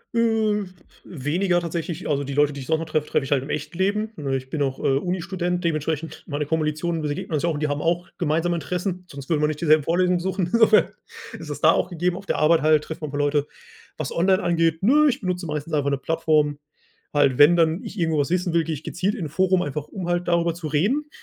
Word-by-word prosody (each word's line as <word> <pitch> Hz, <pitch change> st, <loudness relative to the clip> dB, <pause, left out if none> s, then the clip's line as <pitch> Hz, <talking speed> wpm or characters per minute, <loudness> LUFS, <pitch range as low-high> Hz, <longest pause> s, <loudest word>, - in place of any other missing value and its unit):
Äh, 220 Hz, -3 st, +2 dB, 0.4 s
weniger 175 Hz, +4 st, 0 dB
tatsächlich. 170 Hz, 0 st, -4 dB
Also, 145 Hz, -1 st, 0 dB
die 140 Hz, 0 st, -5 dB
Leute, 145 Hz, 0 st, +3 dB
die 140 Hz, -, -7 dB
ich -, -, -9 dB
so 160 Hz, 0 st, +2 dB
noch 165 Hz, -, -4 dB
treffe, 155 Hz, -1 st, -1 dB
treffe 135 Hz, -, 0 dB
ich 135 Hz, -, -8 dB
halt 135 Hz, -1 st, +1 dB
im 145 Hz, -, -9 dB
echten 150 Hz, +3 st, -4 dB
Leben, 210 Hz, +3 st, 0 dB
ne? 135 Hz, -4 st, -2 dB
Ich 130 Hz, 0 st, -9 dB
bin 150 Hz, 0 st, -3 dB
auch, 135 Hz, -1 st, -1 dB
äh, -, -, -1 dB
Uni-Student, 180 Hz, +1 st, -2 dB
dementsprechend 160 Hz, 0 st, -2 dB
meine 150 Hz, -1 st, -3 dB
Kommilitonen, 160 Hz, +1 st, -1 dB
wir 150 Hz, -, -1 dB
begegnen 145 Hz, +2 st, -4 dB
uns 150 Hz, -, 0 dB
ja 170 Hz, -, +2 dB
auch 160 Hz, -, -1 dB
und -, -, -4 dB
die 150 Hz, -, +1 dB
haben 145 Hz, +1 st, -2 dB
auch 175 Hz, +1 st, 0 dB
gemeinsame 170 Hz, +1 st, 0 dB
Interessen, 180 Hz, +3 st, -3 dB
sonst 140 Hz, +1 st, -9 dB
würden 155 Hz, -2 st, +1 dB
wir 150 Hz, -, +3 dB
nicht 150 Hz, -, -4 dB
dieselben 155 Hz, -3 st, +4 dB
Vorlesungen 180 Hz, +2 st, +2 dB
besuchen, 185 Hz, -1 st, -2 dB
insofern 225 Hz, -2 st, +5 dB, 0.5 s
ist -, -, -8 dB
es -, -, -5 dB
da -, -, +6 dB
auch -, -, 0 dB
gegeben. 175 Hz, +1 st, -1 dB
Auf 195 Hz, +1 st, -9 dB
der -, -, -1 dB
Arbeit 160 Hz, +1 st, +4 dB
halt 155 Hz, -1 st, +3 dB
trifft 160 Hz, +1 st, -7 dB
man 155 Hz, -, -4 dB
'n -, -, -9 dB
paar 145 Hz, -, -3 dB
Leute. 145 Hz, 0 st, +1 dB, 0.5 s
Was -, -, -4 dB
online 185 Hz, +2 st, +2 dB
angeht, 165 Hz, -1 st, +1 dB
ne, 295 Hz, +7 st, +5 dB
ich 260 Hz, -, -1 dB
benutze 180 Hz, -3 st, -3 dB
meistens 150 Hz, +1 st, -4 dB
einfach 145 Hz, -1 st, +1 dB
'ne 140 Hz, -, 0 dB
Plattform. 155 Hz, -1 st, +1 dB, 0.5 s
Halt, 140 Hz, -3 st, +3 dB
wenn 165 Hz, +4 st, +7 dB
dann 165 Hz, +6 st, +2 dB
ich 210 Hz, -3 st, -7 dB
irgendwo 160 Hz, -3 st, +1 dB
was 145 Hz, -, 0 dB
wissen 180 Hz, -1 st, 0 dB
will, 170 Hz, -1 st, +3 dB
gehe 160 Hz, 0 st, -3 dB
ich 150 Hz, -, -7 dB
gezielt 190 Hz, +5 st, -1 dB
in 180 Hz, -8 st, -4 dB
'n -, -, -5 dB
Forum, 185 Hz, +2 st, +2 dB
einfach 145 Hz, +1 st, -4 dB
um 185 Hz, -3 st, -6 dB
halt 175 Hz, 0 st, -1 dB
darüber 170 Hz, -1 st, +2 dB
zu 165 Hz, -1 st, -6 dB
reden, 225 Hz, -, 0 dB
165 Hz, 250 wpm, -23 LUFS, 150-180 Hz, 0.5 s, wenn